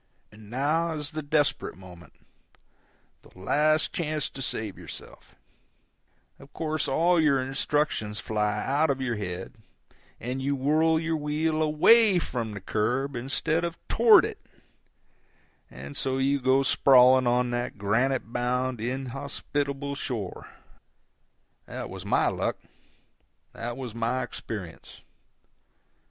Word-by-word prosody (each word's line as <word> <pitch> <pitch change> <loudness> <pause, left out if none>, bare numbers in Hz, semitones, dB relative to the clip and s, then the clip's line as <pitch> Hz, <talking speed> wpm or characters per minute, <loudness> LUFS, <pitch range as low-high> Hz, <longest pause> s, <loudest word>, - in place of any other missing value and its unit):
And 105 0 -15
now 155 +7 0
is 150 -1 -3
the 155 0 -4
desperate 145 - 0
moment, 90 -2 -14 1.1
the - - -20
last 150 +10 +1
chance 155 -3 -1
to 135 - -9
save 110 -5 -3
yourself; - - -10 1.0
of 140 +1 -15
course 155 -2 -2
all 170 +5 +3
your 150 -4 +3
instructions 130 -4 -1
fly 105 -1 -1
out 145 +4 +2
of 135 -1 0
your 120 -4 -2
head, 90 -2 -5 0.7
and 125 +3 -4
you 140 +1 0
whirl 155 +4 +2
your 165 0 -1
wheel 155 +1 -1
AWAY 190 +7 +5
from 115 -10 -3
the - - -5
curb 125 +8 -1
instead 145 +6 -1
of 170 0 -3
TOWARD 230 -1 +6
it, - - -6 1.3
and 70 +3 -10
so 130 0 -1
you 135 +1 +1
go 130 +2 +3
sprawling 130 -1 +5
on 125 0 +2
that 120 -2 -3
granite 115 +4 0
bound 125 0 -1
inhospitable 140 +3 -3
shore. 115 -9 -5 1.2
That - - -6
was - - -8
my - - +3
luck; - - -1 1.0
that 120 +1 -5
was 125 -4 -6
my 115 +3 -1
experience. 100 -8 -8
135 Hz, 125 wpm, -27 LUFS, 120-150 Hz, 1.3 s, TOWARD